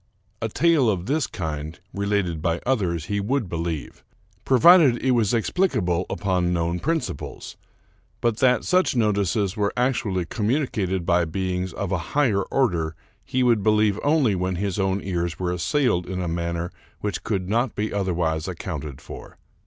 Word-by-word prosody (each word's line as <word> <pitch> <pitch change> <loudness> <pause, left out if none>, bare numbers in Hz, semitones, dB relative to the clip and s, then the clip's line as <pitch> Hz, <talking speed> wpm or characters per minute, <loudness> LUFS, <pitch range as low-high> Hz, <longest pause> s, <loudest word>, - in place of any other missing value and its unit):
A 115 - -1
tale 155 -1 +3
of 95 -4 -1
this 145 +3 0
kind, 80 -2 -5
related 100 -5 -1
by 85 +1 0
others, 90 - 0
he 100 +2 -1
would 115 +2 -1
believe, 85 -3 -4 0.4
provided 145 -1 +6
it 130 - +1
was 115 -5 +2
explicable 105 - +1
upon 90 -3 0
known 85 0 0
principles; 160 - -3 0.6
but 115 -2 0
that 125 -1 +3
such 185 -6 +2
notices 100 -3 +1
were 105 -2 0
actually 110 -8 0
com 105 +4 -3
municated 105 - 0
by 85 0 +3
beings 90 +2 -2
of - - -4
a - - +1 0.2
higher 115 -9 +3
order 85 - 0 0.3
he 130 +4 0
would 120 -4 +3
believe 105 0 +3
only 145 -7 +3
when 90 0 -1
his 100 +1 -2
own 95 0 0
ears 85 -3 -2
were 90 -1 -1
assailed 90 - +1
in 95 0 -3
a 90 - -2
manner 85 +1 -2 0.3
which 105 -1 -3
could 95 -4 -2
not 115 +4 0
be 105 +1 -2
otherwise 85 -5 -1
accounted 80 -6 -5
for. - - -10
100 Hz, 160 wpm, -24 LUFS, 85-120 Hz, 0.6 s, provided